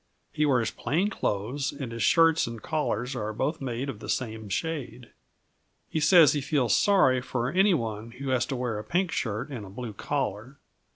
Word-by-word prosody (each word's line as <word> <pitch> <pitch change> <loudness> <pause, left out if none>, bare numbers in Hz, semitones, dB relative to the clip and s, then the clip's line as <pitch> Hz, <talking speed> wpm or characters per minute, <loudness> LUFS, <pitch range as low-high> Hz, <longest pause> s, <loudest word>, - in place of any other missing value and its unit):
He 150 0 +1
wears 125 -5 +2
plain 185 +8 -1
clothes 120 - -2
and 135 -4 -6
his 115 0 -5
shirts 165 -3 +4
and 115 -1 -6
collars 130 -2 -2
are 110 -2 -3
both 150 +8 -2
made 130 0 -3
of 125 -7 -6
the - - -9
same 110 -4 -3
shade. 130 - -4 0.8
He 160 - 0
says 155 -1 +6
he 145 - -1
feels 135 -5 +1
sorry 135 -11 +4
for 125 0 -2
any 190 +2 +4
one 115 -4 -4
who 135 +1 -6
has 130 -2 +1
to 135 - -3
wear 125 -4 -2
a - - -6
pink 180 - 0
shirt 115 +4 -3
with 120 -6 -5
a 95 - -10
blue 110 +2 -7
collar. 130 +1 -3
130 Hz, 190 wpm, -27 LUFS, 115-150 Hz, 0.8 s, says